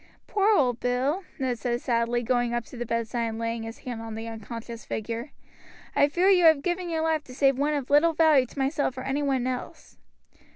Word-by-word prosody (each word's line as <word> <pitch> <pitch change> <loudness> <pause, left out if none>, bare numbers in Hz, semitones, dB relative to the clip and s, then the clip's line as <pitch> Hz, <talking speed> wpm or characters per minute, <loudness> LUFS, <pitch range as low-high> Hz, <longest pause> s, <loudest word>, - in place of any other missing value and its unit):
"Poor 405 0 +1
old 250 -4 +2
Bill," 265 +9 0
Ned 255 -5 -2
said 240 0 -1
sadly, 240 0 0
going 240 0 +1
up 240 -1 -2
to - - -12
the 240 -1 -5
bedside 230 +1 -1
and 225 0 -4
laying 230 0 -2
his 225 +1 -7
hand 240 -3 -5
on 225 -1 -6
the 225 +1 -6
unconscious 230 +1 -7
figure. 230 +5 -4 0.7
"I 285 - +5
fear 350 +6 +1
you 360 -3 +5
have 315 -3 +6
given 355 0 -1
your 320 -1 -1
life 320 -2 +1
to 255 - -11
save 270 -1 +3
one 295 +1 +1
of 280 -2 -4
little 315 +3 +5
value 310 -5 +4
to - - -17
myself 270 -1 0
or - - -4
any 270 +2 -1
one 270 -3 0
else." 255 -1 -6
255 Hz, 215 wpm, -26 LUFS, 235-295 Hz, 0.7 s, have